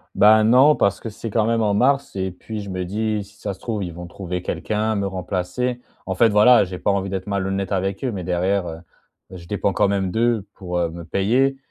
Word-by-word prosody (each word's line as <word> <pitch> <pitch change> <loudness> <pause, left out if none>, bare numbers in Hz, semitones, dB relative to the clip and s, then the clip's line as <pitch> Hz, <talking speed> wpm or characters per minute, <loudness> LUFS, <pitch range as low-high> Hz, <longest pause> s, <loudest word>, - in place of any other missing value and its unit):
Bah, 110 +1 +6
non, 130 +6 +6
parce 100 0 +1
que 115 - -5
c'est, 110 +2 -7
quand 110 +1 +1
même, 115 0 +1
en 105 -2 +2
mars, 135 +5 +1
et 95 -1 -2
puis 105 +4 -7
je 100 - -8
me 95 -1 -3
dis: 105 +3 -1
«Si 100 0 -20
ça 100 0 -4
se 95 - -16
trouve, 110 -4 -3
ils 85 -2 -5
vont 85 +1 -8
trouver 90 0 -5
quelqu'un, 110 +4 -2
me 100 -1 -1
remplacer». 95 +6 -3 0.2
En 95 - -3
fait, 115 +4 +4
voilà, 105 +3 +6
j'ai 90 -1 -6
pas - - 0
envie 100 -1 0
d'être 95 0 -4
malhonnête 95 0 -2
avec 95 +1 -1
eux, 125 - -1
mais 95 -2 -4
derrière, 90 +2 0
heu, 80 -1 -6 0.5
je 90 -2 -10
dépends 100 +2 -1
quand 105 0 +2
même 95 -2 0
d'eux 115 -1 +1
pour, 90 -2 -5
heu, 85 -1 0
me 85 +1 -8
payer 120 +11 +1
100 Hz, 235 wpm, -22 LUFS, 95-110 Hz, 0.5 s, Bah